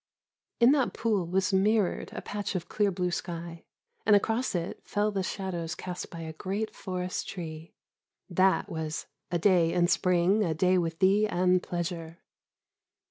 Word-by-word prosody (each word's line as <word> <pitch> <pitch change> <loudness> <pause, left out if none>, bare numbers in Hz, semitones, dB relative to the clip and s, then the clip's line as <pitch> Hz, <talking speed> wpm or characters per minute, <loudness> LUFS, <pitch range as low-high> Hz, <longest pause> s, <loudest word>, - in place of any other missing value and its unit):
In 240 +2 +7
that 275 -4 +2
pool 205 -7 0
was 190 +2 +1
mirrored 205 0 +2
a - - -6
patch 205 -1 -4
of 180 - -3
clear 205 -1 +1
blue 180 -1 -1
sky, 170 -1 -5 0.4
and 210 - +6
across 225 +3 +1
it 170 0 -3
fell 210 +1 0
the 195 -2 -1
shadows 185 -3 -3
cast 180 -1 -6
by 165 -2 -8
a 160 -1 -6
great 195 +6 -3
forest 185 -2 -4
tree. 160 -3 -7 0.5
That 190 +1 +2
was 160 -1 -4 0.2
"a 175 - 0
day 170 -2 +4
in 175 0 +3
spring, 180 +4 +3
a 165 -4 0
day 185 +3 +3
with 165 -1 -2
thee 200 +4 +4
and 180 -1 +2
pleasure!" 170 -2 -4
185 Hz, 160 wpm, -29 LUFS, 170-200 Hz, 0.5 s, In